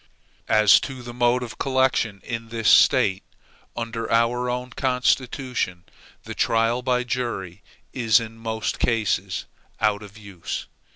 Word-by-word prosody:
As 110 -2 +6
to 130 -3 -7
the 120 0 -8
mode 120 +1 +2
of 120 - -9
collection 130 -6 +1
in 115 -1 -5
this 115 -2 -2
State, 95 -1 +5 0.6
under 115 -1 -4
our 120 +2 +2
own 125 +1 -3
Constitution, 125 -6 -1 0.4
the - - -7
trial 115 +2 +1
by 125 0 +1
jury 115 -7 -4 0.3
is 115 -3 +3
in 115 -1 -7
most 110 -1 -3
cases 115 -4 0 0.3
out 105 -2 +1
of 105 0 -12
use. 100 -5 -6
115 Hz, 130 wpm, -23 LUFS, 110-125 Hz, 0.6 s, As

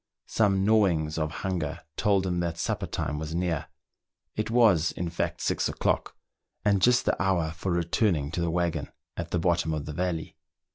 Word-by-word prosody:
Some 100 -3 +2
gnawings 85 -8 +2
of 80 -1 0 0.2
hunger 85 -3 -2
told 100 -2 +2
him 90 -1 0
that 85 -1 -2
supper - - -2
time 75 +2 -3
was 80 +1 -4
near; 85 -3 -1 0.7
it 110 - -2
was, 110 -9 +4
in 85 -1 -4
fact, 85 - -2
six - - 0
o'clock, - - -1 0.5
and 100 -2 +3
just 125 +4 +4
the - - +1
hour 90 -4 +1
for 85 +3 -3
returning 85 -3 +1
to 85 - -2
the 85 - +1
waggon 85 -3 -1 0.3
at 85 0 -4
the 90 - 0
bottom 85 -2 +1
of 75 -1 -4
the 75 - -5
valley. 85 -1 -2
85 Hz, 180 wpm, -27 LUFS, 80-95 Hz, 0.7 s, was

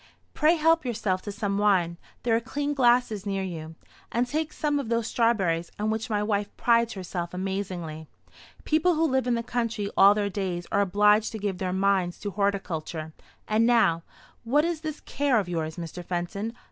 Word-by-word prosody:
Pray 315 +2 +4
help 325 0 +3
yourself 215 -7 -1
to 205 - -6
some 200 0 -2
wine, 185 -5 +2 0.3
there 230 -2 +2
are - - +3
clean 285 +4 -3
glasses 245 -6 +3
near 195 -1 -2
you; 160 -3 -6 0.4
and 240 +1 +1
take 310 +4 -2
some 295 -2 0
of 260 -5 -4
those 230 -1 +1
strawberries, 190 -9 +1
on 215 +1 0
which 225 +2 -3
my 210 -1 0
wife 205 -1 0
prides 235 0 +3
herself 180 -2 -5
amazingly. 180 -5 -4 0.6
People 320 +3 +2
who 320 +1 +2
live 265 -4 +1
in 245 - +2
the 230 - -2
country 230 -4 -2
all 200 +1 +7
their 205 -1 0
days 185 -3 -3
are 200 - +3
obliged 210 +2 +3
to 225 - -5
give 200 -3 -3
their 185 -1 -1
minds 190 -2 +1
to 205 - -4
horticulture. 175 -5 -2 0.3
And 220 +2 +3
now, 200 -9 +4 0.4
what 285 +7 +2
is 335 -2 -2
this 310 -2 -5
care 280 -4 +1
of 195 - -3
yours, 160 -3 -3
Mr. 175 +1 -6
Fenton? 190 +6 -3
205 Hz, 185 wpm, -26 LUFS, 185-240 Hz, 0.6 s, all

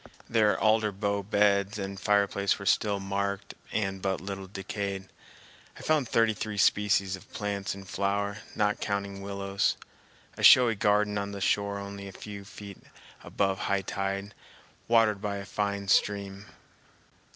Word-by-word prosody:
Their 110 -2 +3
alder 110 -1 +3
bough 100 0 -1
beds 100 0 +2
and 100 -1 -5
fireplace 100 -1 +2
were 100 - -8
still 100 +1 +2
marked 100 0 -3 0.2
and 95 -2 -1
but 95 -1 -1
little 95 0 -6
decayed. 100 0 -5 0.7
I - - -10
found 150 -6 +1
thirty 115 -1 +3
three 105 +1 -5
species 100 -2 +3
of 95 - -15
plants 100 -2 -3
in 100 - -9
flower, 100 +2 -1 0.2
not 105 0 +1
counting 100 -1 -3
willows—a 100 0 -4
showy 125 -3 +8
garden 105 0 +2
on 100 0 -4
the 100 - -5
shore 100 +1 +1
only 100 0 -7
a - - -8
few 100 +1 -9
feet 100 -1 -10 0.4
above 95 -1 0
high 100 -1 +1
tide, 100 +2 -3 0.5
watered 115 -3 +3
by 100 -1 -2
a 100 - -6
fine 100 -1 -2
stream. 100 0 +1
100 Hz, 145 wpm, -28 LUFS, 100-105 Hz, 0.7 s, showy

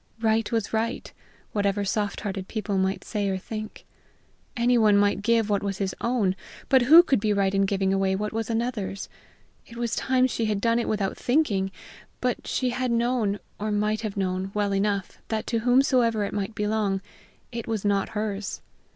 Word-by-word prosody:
Right 220 0 +1
was 225 -2 -1
right, 230 +4 -2 0.4
whatever 200 -1 0
soft 205 +1 -1
hearted 195 -2 -4
people 210 -3 -2
might 190 +1 0
say 205 -3 -2
or 190 - -1
think. 215 +3 -7 0.7
Anyone 235 -4 +4
might 205 0 +2
give 225 0 +2
what 205 -2 +1
was 200 -1 -3
his 195 -2 -2
own, 230 -6 +1 0.3
but 265 -2 +6
who 315 +8 +9
could 270 - +2
be 210 0 +1
right 195 -1 +1
in 195 0 +2
giving 195 -1 +1
away 195 0 +1
what 210 +2 -3
was 225 0 -2
another's? 225 -4 -2 0.6
It 235 - -12
was 235 -1 -1
time 255 -1 +2
she 235 -3 -1
had 210 -2 0
done 230 +2 +2
it 235 - -2
without 200 -3 -1
thinking; 245 -9 +1 0.5
but 250 -1 -2
she 255 -2 0
had 255 +1 -1
known, 235 -3 +1 0.2
or 215 +1 -2
might 210 +1 0
have 215 -3 -4
known, 185 0 -1
well 205 -1 +1
enough 200 -1 -1
that 220 -1 -2
to 230 - 0
whomsoever 245 -2 +3
it 200 - -3
might 205 +1 -3
belong, 210 -2 0 0.5
it 235 -2 -5
was 220 -3 -2
not 200 -1 +1
hers. 210 -1 -3
210 Hz, 185 wpm, -26 LUFS, 200-235 Hz, 0.7 s, who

